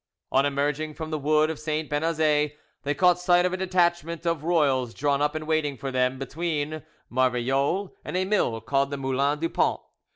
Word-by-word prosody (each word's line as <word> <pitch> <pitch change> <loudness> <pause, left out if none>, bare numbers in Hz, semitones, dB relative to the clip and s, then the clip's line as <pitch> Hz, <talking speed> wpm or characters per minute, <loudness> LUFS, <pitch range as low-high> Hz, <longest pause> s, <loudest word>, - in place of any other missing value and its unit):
On 135 +2 +3
emerging 145 +2 -1
from 160 -1 -6
the 155 - -1
wood 155 +2 +2
of 160 - -7
St. 155 0 -2
Benazet, 150 -1 +1 0.2
they 145 +1 -1
caught 180 +4 +4
sight 180 0 +4
of 180 - 0
a - - -1
detachment 175 -2 0
of 165 -3 0
royals 140 -8 +1
drawn 145 0 +1
up 150 +1 +1
and 155 0 -4
waiting 155 -3 0
for 135 +1 -4
them 130 0 +1
between 155 +2 -3 0.3
Marvejols 130 - +1
and - - -3
a 185 - +1
mill 185 - +1
called 135 +4 +1
the 140 - -4
Moulin 135 +2 0
du 165 +2 -1
Pont. - - +1
150 Hz, 190 wpm, -26 LUFS, 140-165 Hz, 0.3 s, caught